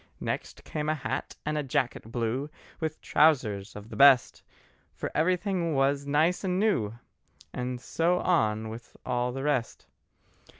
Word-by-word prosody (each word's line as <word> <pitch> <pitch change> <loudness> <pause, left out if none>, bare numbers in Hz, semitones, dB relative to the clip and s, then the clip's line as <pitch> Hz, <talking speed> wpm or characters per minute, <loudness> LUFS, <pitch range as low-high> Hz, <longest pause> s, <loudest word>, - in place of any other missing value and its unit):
Next - - -4
came 150 -1 -3
a 155 - +2
hat 145 - -4
and 150 0 0
a - - +1
jacket 125 -4 -2
blue, 120 +5 -1 0.3
With 160 -1 -3
trousers 110 -11 +2
of 105 +1 -9
the - - -8
best, 135 -3 +6 0.5
For - - -4
everything 175 0 +1
was 140 +1 +1
nice 155 +7 +2
and 185 -1 0
new, 125 - +1 0.6
And 125 0 -3
so 170 +7 +1
on 110 -13 +1
with 115 +2 -10
all 125 0 0
the 135 +2 -5
rest. 140 -6 -1
140 Hz, 145 wpm, -28 LUFS, 120-160 Hz, 0.6 s, best